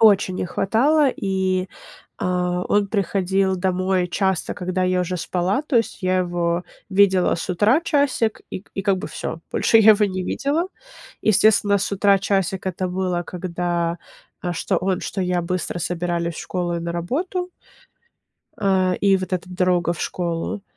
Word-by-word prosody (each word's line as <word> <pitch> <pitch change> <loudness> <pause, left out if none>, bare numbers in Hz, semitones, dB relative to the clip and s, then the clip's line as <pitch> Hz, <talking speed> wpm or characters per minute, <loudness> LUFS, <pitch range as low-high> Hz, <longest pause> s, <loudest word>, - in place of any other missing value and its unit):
Очень 200 -4 +5
не 180 - -2
хватало, 275 - +2
и, 190 -1 -1 0.5
а, 180 0 -1
он 205 -1 +2
приходил 195 -1 +1
домой 185 0 0
часто, 190 -1 0
когда 185 +1 -2
я 185 0 +2
уже 180 0 -2
спала, 180 - -1
то 300 -4 0
есть 230 -3 0
я 185 0 +2
его 175 -1 -1 0.3
видела 190 -2 +4
с 165 - -5
утра 210 - +3
часик 280 -9 +1
и - - -5
к - - -30
и 195 - -3
как 195 -1 +2
бы - - -5
всё. - - -5
Больше 225 - +4
я 220 0 +8
его 210 0 +2
не 185 -1 -3
видела. 300 +5 -1 0.6
Естественно, 205 -1 +4
с 200 - -3
утра 200 0 +4
часик 195 -1 -1
это 185 0 -2
было, 180 -1 -1
когда, 175 -1 -2 0.4
а, 175 -1 -2
что 165 - -1
он, 185 0 -1
что 195 - -4
я 180 -1 0
быстро 180 0 -3
собирались 170 -1 -2
в - - -6
школу 175 -2 -2
и - - -3
на 170 0 -4
работу. 335 - -2 1.1
А, 190 -2 +2
и 195 -1 +4
вот 185 -1 -5
эта 180 0 -2
дорога 180 -2 +1
в 170 - -8
школу. 170 +2 -3
185 Hz, 170 wpm, -22 LUFS, 180-200 Hz, 1.1 s, я